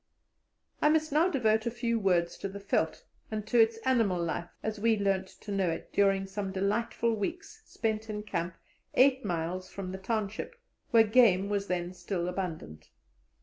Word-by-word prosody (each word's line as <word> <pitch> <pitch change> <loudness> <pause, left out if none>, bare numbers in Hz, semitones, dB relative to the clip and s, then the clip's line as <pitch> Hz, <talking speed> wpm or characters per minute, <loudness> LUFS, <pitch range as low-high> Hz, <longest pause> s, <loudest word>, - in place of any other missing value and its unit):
I 300 - +5
must 310 0 +2
now 315 +5 +4
devote 220 -7 +2
a - - +3
few 235 -1 -1
words 175 -4 +2
to 195 - -3
the 195 - -7
veldt 200 -5 -1 0.3
and 215 -1 -3
to 235 +2 +2
its 225 0 +3
animal 225 -9 +2
life 170 +1 -2
as 215 -1 -3
we 225 +1 +3
learnt 195 -2 0
to 205 - -10
know 195 -3 +1
it 165 - -5
during 195 -1 +3
some 195 0 -4
delightful 220 +4 0
weeks 360 - -5
spent 220 -1 -2
in 210 0 -4
camp 170 -4 -3 0.4
eight 265 0 +5
miles 180 0 -3
from 190 -2 -6
the 190 - -6
township, 220 - -3 0.3
where 230 -1 +6
game 210 -4 +4
was 200 -1 -1
then 180 0 -2
still 175 0 -3
abundant. 165 - -5
205 Hz, 175 wpm, -30 LUFS, 185-230 Hz, 0.4 s, where